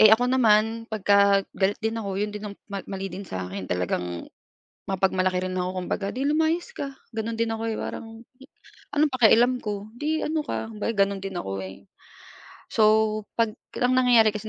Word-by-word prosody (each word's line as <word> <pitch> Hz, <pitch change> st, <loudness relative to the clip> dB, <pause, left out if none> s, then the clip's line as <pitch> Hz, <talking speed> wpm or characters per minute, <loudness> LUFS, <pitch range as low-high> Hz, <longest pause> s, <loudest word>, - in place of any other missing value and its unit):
Eh, 215 Hz, -, +9 dB
ako 245 Hz, +3 st, +4 dB
naman 225 Hz, -2 st, +3 dB
pagka 200 Hz, -1 st, +4 dB
galit 195 Hz, +1 st, +2 dB
din 225 Hz, 0 st, -1 dB
ako, 200 Hz, -3 st, -4 dB
yun 210 Hz, 0 st, -1 dB
din 210 Hz, -1 st, -6 dB
ang -, -, -13 dB
ma 200 Hz, -1 st, -4 dB
mali 195 Hz, 0 st, -5 dB
din 195 Hz, +2 st, -6 dB
sa 95 Hz, -, -5 dB
akin, 95 Hz, 0 st, -5 dB
talagang 90 Hz, -1 st, -2 dB, 0.6 s
mapagmalaki 185 Hz, -1 st, +1 dB
rin 185 Hz, -, -3 dB
ako, 180 Hz, 0 st, -2 dB
kumbaga, 195 Hz, +1 st, -2 dB
"'Di 265 Hz, +2 st, -2 dB
lumayas 320 Hz, +8 st, +1 dB
ka," 280 Hz, -, -4 dB, 0.2 s
Gano'n 225 Hz, 0 st, -3 dB
din 230 Hz, 0 st, 0 dB
ako 225 Hz, 0 st, -4 dB
eh, 220 Hz, -, -2 dB
parang -, -, -5 dB, 0.9 s
anong 295 Hz, -1 st, +3 dB
pakialam 245 Hz, +1 st, +5 dB
ko, 205 Hz, -1 st, -4 dB
'di 310 Hz, +1 st, -1 dB
ano 310 Hz, 0 st, 0 dB
ka, 225 Hz, -, -3 dB
kumbaga 215 Hz, +2 st, -2 dB
ganun 195 Hz, -1 st, -4 dB
din 195 Hz, -2 st, -5 dB
ako 95 Hz, -, -4 dB
eh. 95 Hz, 0 st, -10 dB, 0.9 s
So, 220 Hz, -, +2 dB, 0.6 s
'pag 230 Hz, -2 st, +2 dB, 0.3 s
ang 250 Hz, +1 st, +3 dB
nangyayari 235 Hz, -4 st, +5 dB
kasi 215 Hz, +1 st, -5 dB
210 Hz, 180 wpm, -25 LUFS, 195-230 Hz, 0.9 s, Eh